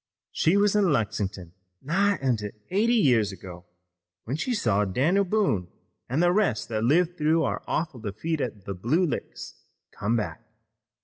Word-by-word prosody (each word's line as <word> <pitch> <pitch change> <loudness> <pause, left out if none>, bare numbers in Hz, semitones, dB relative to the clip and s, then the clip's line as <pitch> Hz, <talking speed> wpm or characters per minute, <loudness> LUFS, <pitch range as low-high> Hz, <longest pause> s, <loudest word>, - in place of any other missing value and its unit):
She 175 +5 +2
was 205 0 +3
in 205 -1 +4
Lexin'ton 105 - -2 0.3
nigh 195 +7 +1
on 130 -3 +2
to 105 -1 -5 0.2
eighty 225 +5 +3
years 120 - +3
ago, 90 -2 -10 0.6
when 125 - -3
she 245 - -1
saw 105 - +1
Dan'l 145 - +2
Boone 185 - 0 0.4
an' 135 +7 +1
the 175 0 +4
rest 180 - +1
that 110 -1 -1
lived 175 +7 +2
through 160 +2 +3
our - - -2
awful 155 -6 -2
defeat 120 +10 -3
at 105 -5 -5
the 100 - -4
Blue 125 - +1
Licks 155 - -5 0.4
come 105 +3 -1
back. 95 -9 -3
135 Hz, 165 wpm, -26 LUFS, -, 0.6 s, in